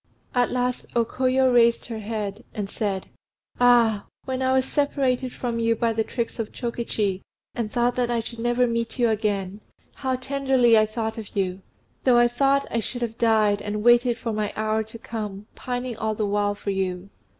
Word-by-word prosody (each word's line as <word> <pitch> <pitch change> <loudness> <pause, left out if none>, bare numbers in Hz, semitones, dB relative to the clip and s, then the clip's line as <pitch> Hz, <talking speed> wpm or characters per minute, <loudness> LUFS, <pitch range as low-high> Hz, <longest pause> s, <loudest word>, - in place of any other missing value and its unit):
At 245 -1 +2
last 250 0 -1
O 235 -1 +3
Koyo 255 +1 +2
raised 235 -1 +4
her 225 -2 -5
head 210 0 -4
and 200 -2 -4
said, 200 -4 -2 0.5
"Ah! 235 -4 +4 0.2
when 260 0 -2
I 260 0 +2
was 260 0 +3
separated 265 -3 0
from 235 -2 -3
you 230 0 +2
by 230 0 +1
the 220 0 +1
tricks 235 +1 -4
of 225 - -3
Chokichi, 220 -5 -2 0.3
and 225 -3 -3
thought 240 0 +1
that 245 -1 +1
I 240 -1 +1
should 230 +1 -7
never 240 +1 +2
meet 230 0 -2
you 240 -2 +3
again, 205 -2 -1 0.3
how 260 -1 -1
tenderly 260 -2 +3
I 215 0 +5
thought 220 0 -3
of 215 - -10
you! 190 -1 -1 0.4
I 240 -2 +5
thought 275 +3 +2
I 230 - +1
should 245 +2 -4
have 225 -1 -4
died, 215 -3 +3
and 210 0 -3
waited 240 0 +5
for 230 -2 -3
my 210 -1 -1
hour 215 0 0
to 220 +1 -8
come, 210 -3 -6
pining 245 -1 -4
all 220 -1 -1
the 215 - -1
while 205 0 0
for 200 - -3
you. 190 0 -3
230 Hz, 190 wpm, -24 LUFS, 215-245 Hz, 0.5 s, I